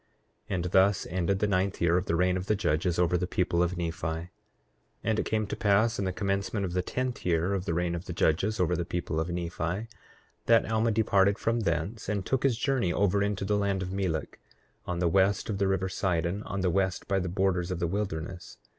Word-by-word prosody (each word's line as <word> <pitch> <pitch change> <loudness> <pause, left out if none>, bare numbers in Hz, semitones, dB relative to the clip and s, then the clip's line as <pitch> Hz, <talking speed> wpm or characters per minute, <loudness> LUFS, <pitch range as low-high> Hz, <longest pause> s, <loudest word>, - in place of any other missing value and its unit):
8:2 95 - 0
And 90 - -1
thus 95 +1 +4
ended 95 +1 +1
the 105 - +1
ninth 95 0 0
year 85 0 +3
of 90 +2 0
the 85 - +1
reign 90 +2 +2
of 95 +1 -3
the 105 - +2
judges 85 -1 0
over 90 0 +2
the 90 - -1
people 90 -1 +1
of 90 +1 0
Nephi. 80 -2 -3
8:3 80 +2 -4 0.7
And 110 -1 +1
it - - -1
came 110 -1 0
to 105 - -4
pass 110 +2 +2
in 100 - 0
the 95 - 0
commencement 100 +1 -1
of 90 - -4
the 90 - +1
tenth 125 +6 -3
year 85 +2 +1
of 95 -1 -2
the 85 - -1
reign 85 0 0
of 85 +1 -5
the 90 - -5
judges 95 +7 +1
over 90 -1 +2
the 85 - -1
people 85 -2 -3
of 80 +2 -2
Nephi, 85 +4 -3 0.6
that 115 -1 +4
Alma 110 +1 +2
departed 100 -2 +3
from 115 +1 0
thence 95 +2 -2
and 100 -3 -1
took 130 +5 0
his 130 -4 +2
journey 125 -8 +1
over 100 +1 +2
into 100 -1 -1
the 105 +1 +1
land 100 -2 0
of 90 - -5
Melek, 95 -5 -2 0.5
on 90 - -2
the 85 0 +1
west 95 +5 +2
of 100 - -3
the 100 - +2
river 95 -1 0
Sidon, 90 0 -1
on 100 - -3
the 90 -1 +2
west 95 0 0
by 95 -1 +1
the 90 -1 -2
borders 90 -1 0
of 90 - -2
the 85 - -1
wilderness. 90 -2 -4
95 Hz, 235 wpm, -28 LUFS, 85-100 Hz, 0.7 s, thus